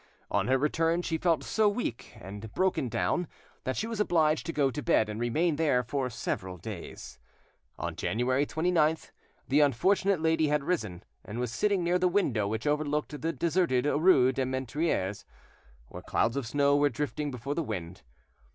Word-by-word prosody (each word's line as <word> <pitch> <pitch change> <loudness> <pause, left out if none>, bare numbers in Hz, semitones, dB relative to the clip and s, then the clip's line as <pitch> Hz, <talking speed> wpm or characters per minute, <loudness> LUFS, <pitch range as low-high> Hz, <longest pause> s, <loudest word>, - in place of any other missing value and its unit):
On - - +1
her 130 +1 +3
return 165 +4 +1
she 165 -2 -2
felt 170 -2 +1
so 215 -1 +2
weak 205 - -4
and 105 +3 -8
broken 185 -9 +1
down 175 +9 0 0.4
that 130 - -2
she - - -1
was 225 -2 -4
obliged 160 -6 +2
to - - -1
go 140 -4 +1
to 140 - -4
bed 110 -10 +2
and 105 +1 -5
remain 150 +7 +1
there 145 -6 +2
for 130 +2 -2
several 95 -5 -4
days. 100 -1 -8 0.6
On - - -4
January 130 +5 0
29th 160 -1 +1 0.4
the 140 +3 +3
unfortunate 185 - +3
lady 160 -1 +2
had 150 -1 +1
risen, 110 - -2 0.2
and 105 - -7
was 125 -2 -2
sitting 200 - +1
near 175 +1 +2
the 180 - +3
window 135 - +1
which 110 +2 -3
overlooked 150 0 -1
the 165 - 0
deserted 165 -7 +1
rue 145 -4 +4
des 130 0 -1
Menetriers, 130 - -2 0.7
where - - -8
clouds 115 +3 0
of 140 -4 -2
snow 140 +3 +3
were 145 0 +4
drifting 145 +3 -3
before 130 +2 -4
the 165 - -1
wind. 90 - -5
145 Hz, 175 wpm, -29 LUFS, 120-165 Hz, 0.7 s, rue